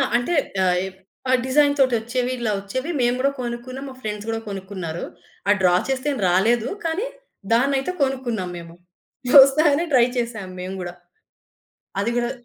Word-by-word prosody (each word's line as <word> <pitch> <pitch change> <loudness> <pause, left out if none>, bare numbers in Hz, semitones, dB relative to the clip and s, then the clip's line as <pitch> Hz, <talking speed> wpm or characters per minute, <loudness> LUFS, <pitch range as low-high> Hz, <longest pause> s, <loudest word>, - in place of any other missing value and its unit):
అంటే 245 +9 +1 0.3
ఆహ్, 180 0 +2 0.5
ఆ - - +3
డిజైన్‌తోటొచ్చేవి 255 -3 +2
ఇలా 225 -2 0
వచ్చేవి. 255 - -4
మేము 245 0 +2
కూడా 275 +2 +2
కొనుక్కున్నాం. 250 +2 -5
మా 260 - -11
ఫ్రెండ్స్ 210 -1 -5
కూడా 225 0 -1
కొనుక్కున్నారు. 190 -4 -5 0.5
ఆ - - +7
డ్రా 180 -1 +5
చేస్తే 265 +2 -1
ఏం - - -5
రాలేదు. 220 +6 +2 0.2
కానీ 350 +9 -1 0.5
దాన్నయితే 270 +6 +2
కొనుక్కున్నాం 245 -8 -2
మేము. 170 0 -10 0.7
వస్తదనే 295 +3 +4
ట్రై 245 -2 +6
చేసాం 230 -5 -3
మేము 185 +1 -5
గూడా. 175 -1 -5 1.1
అది 220 +4 0
గూడా. 240 0 0
240 Hz, 140 wpm, -22 LUFS, 200-270 Hz, 1.1 s, ఆ